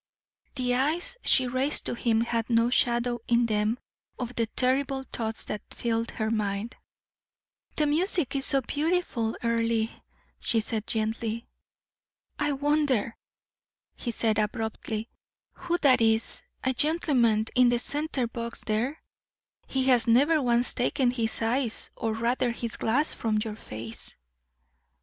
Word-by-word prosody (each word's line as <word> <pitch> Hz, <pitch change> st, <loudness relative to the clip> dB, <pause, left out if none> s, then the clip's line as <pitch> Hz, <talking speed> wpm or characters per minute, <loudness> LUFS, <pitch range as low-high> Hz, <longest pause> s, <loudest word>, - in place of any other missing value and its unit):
The 250 Hz, -2 st, 0 dB
eyes 300 Hz, -, 0 dB
she 260 Hz, -, +4 dB
raised 255 Hz, +4 st, +1 dB
to -, -, -1 dB
him 230 Hz, -2 st, +1 dB
had 230 Hz, 0 st, -1 dB
no 230 Hz, 0 st, +3 dB
shadow 240 Hz, -1 st, +1 dB
in 235 Hz, 0 st, +3 dB
them 215 Hz, +1 st, +1 dB, 0.4 s
of 250 Hz, -1 st, -4 dB
the 230 Hz, -2 st, 0 dB
terrible 265 Hz, +3 st, 0 dB
thoughts 225 Hz, -4 st, -4 dB
that 210 Hz, -, -4 dB
filled 230 Hz, -1 st, -2 dB
her 220 Hz, -1 st, -2 dB
mind. 210 Hz, +1 st, -2 dB, 1.0 s
"The 305 Hz, -, +2 dB
music 315 Hz, -, +2 dB
is 270 Hz, 0 st, +3 dB
so 275 Hz, -, +3 dB
beautiful, 290 Hz, -5 st, -1 dB
Earle," 230 Hz, -1 st, +1 dB, 0.5 s
she 230 Hz, -, +2 dB
said, 220 Hz, 0 st, -2 dB
gently. 225 Hz, +1 st, -2 dB, 0.9 s
"I 295 Hz, -1 st, +1 dB
wonder," 280 Hz, -5 st, +1 dB, 0.8 s
he 245 Hz, -, -4 dB
said, 220 Hz, -2 st, +1 dB
abruptly, 220 Hz, 0 st, -2 dB, 0.5 s
"who 350 Hz, -1 st, -2 dB
that 255 Hz, -4 st, +6 dB
is 225 Hz, 0 st, +1 dB, 0.2 s
a 260 Hz, -, +1 dB
gentleman 250 Hz, -7 st, +3 dB
in 250 Hz, -1 st, +6 dB
the 240 Hz, -, +2 dB
center 285 Hz, +1 st, 0 dB
box 235 Hz, 0 st, -5 dB
there? 235 Hz, +8 st, -2 dB, 0.6 s
He 265 Hz, -1 st, 0 dB
has 250 Hz, -3 st, +3 dB
never 290 Hz, +7 st, +4 dB
once 240 Hz, -1 st, +2 dB
taken 250 Hz, 0 st, +1 dB
his 230 Hz, -2 st, -1 dB
eyes, 235 Hz, 0 st, -1 dB
or 225 Hz, -1 st, -2 dB
rather 235 Hz, +2 st, 0 dB
his 235 Hz, -1 st, -4 dB
glass, 275 Hz, +8 st, +1 dB
from 220 Hz, -2 st, -1 dB
your 215 Hz, 0 st, -2 dB
face." 110 Hz, -, -7 dB
235 Hz, 135 wpm, -27 LUFS, 225-265 Hz, 1.0 s, that